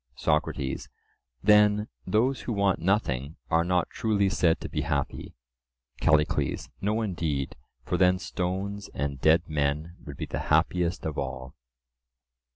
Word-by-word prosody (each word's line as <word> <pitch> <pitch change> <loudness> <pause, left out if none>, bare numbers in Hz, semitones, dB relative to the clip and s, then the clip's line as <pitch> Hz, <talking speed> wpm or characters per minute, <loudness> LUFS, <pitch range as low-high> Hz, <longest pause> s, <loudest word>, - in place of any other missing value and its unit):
SOCRATES: 65 -1 -1 0.5
Then 105 +1 +5 0.2
those 125 +5 +2
who 120 - -3
want 100 -2 +2
nothing 80 -7 0 0.2
are 80 +1 +4
not 90 0 0
truly 100 -3 +1
said 85 -3 +2
to - - -4
be 75 - -2
happy? 70 -1 -3 0.6
CALLICLES: 80 -2 +1
No 105 +3 0
indeed, 80 -8 -2 0.3
for 90 - -1
then 90 0 +4
stones 95 +3 -3
and 70 -1 -3
dead 80 +2 +5
men 75 +3 -1
would - - -9
be - - -3
the - - -4
happiest 90 0 +2
of 80 -2 -2
all. 65 -1 -5
85 Hz, 135 wpm, -27 LUFS, 75-100 Hz, 0.6 s, Then